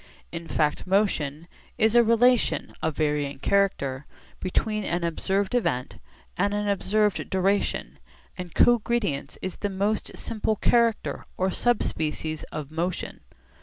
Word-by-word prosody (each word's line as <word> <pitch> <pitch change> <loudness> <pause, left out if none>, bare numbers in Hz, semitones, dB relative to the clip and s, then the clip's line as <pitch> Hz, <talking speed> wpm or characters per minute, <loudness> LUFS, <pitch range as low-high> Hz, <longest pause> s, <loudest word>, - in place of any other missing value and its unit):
In 165 0 -6
fact 150 +3 0
motion 170 -6 0 0.3
is 220 -1 +3
a 240 0 +7
relation 235 +2 +3
(of 160 -2 -1
varying 150 -2 0
character) 140 -7 0 0.3
between 215 +3 -1
an 175 -2 -1
observed 190 +5 -1
event 125 - -1 0.4
and 200 +2 +1
an 210 0 -1
observed 205 +1 +1
duration, 195 +2 0 0.4
and 180 -3 -8
cogredience 225 -12 +2
is 185 - -4
the 205 - -2
most 200 +2 -1
simple 220 -1 -1
character 230 +1 +1
or 190 +1 +1
subspecies 160 -10 -1
of 150 -1 -6
motion. 170 +3 -3
190 Hz, 125 wpm, -26 LUFS, 160-215 Hz, 0.4 s, a